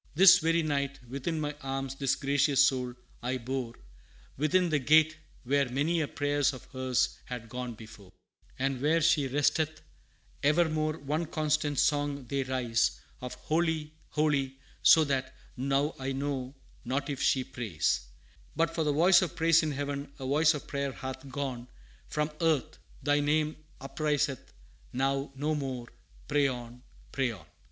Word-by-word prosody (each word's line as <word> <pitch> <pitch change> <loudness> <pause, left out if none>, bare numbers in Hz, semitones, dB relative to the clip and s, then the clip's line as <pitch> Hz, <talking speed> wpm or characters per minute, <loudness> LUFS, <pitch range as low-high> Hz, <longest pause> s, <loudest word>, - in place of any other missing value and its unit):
"This 185 +2 +9
very 165 0 +2
night 140 -2 -1
within 140 +6 -3
my 150 -1 -3
arms 135 0 -3
this 135 0 0
gracious 140 0 +3
soul 125 -2 0 0.3
I 125 +2 -1
bore 125 -1 -4 0.6
Within 170 +5 +2
the 155 -2 +2
Gate, 155 +3 +5 0.3
where 140 +1 +1
many 150 +6 +1
a 150 - -1
prayer 145 +1 -1
of 135 -3 0
hers 130 -1 0
had 120 -2 -7
gone 125 0 -5
before; 110 -3 -13 0.5
"And 135 -1 -1
where 155 +3 +3
she 155 -3 +3
resteth, 150 +3 0 0.6
evermore 155 0 +2
one 155 +3 -2
constant 150 -2 0
song 145 -2 +1
they 135 +3 -1
raise 125 -3 0 0.2
Of 125 -1 -6
'Holy, 160 -1 -1 0.2
holy,' 140 -3 0 0.2
so 160 - +7
that 135 -3 -2 0.2
now 140 +3 0
I 135 +1 -2
know 135 -1 -3 0.3
not 135 +3 -2
if 140 -1 -4
she 135 -1 +3
prays; 105 - -1 0.5
"But 165 +2 +1
for 165 - 0
the 150 - +1
voice 175 +5 +6
of 180 - -2
praise 165 0 +4
in 155 -1 -1
Heaven, 140 0 -4
a 135 - -6
voice 150 +4 +4
of 145 - -6
Prayer 140 -1 -3
hath 130 +1 -7
gone 130 -3 -4 0.4
From 150 0 -1
Earth; 160 -6 +1 0.2
thy 145 +1 +3
name 150 +1 +1 0.2
upriseth 145 -1 -1 0.4
now 135 +2 0
no 150 +3 -1
more; 130 -5 -4 0.4
pray 145 -1 +3
on, 120 -1 -6 0.3
pray 135 -2 0
on!" 90 -8 -13
140 Hz, 155 wpm, -30 LUFS, 130-155 Hz, 0.6 s, This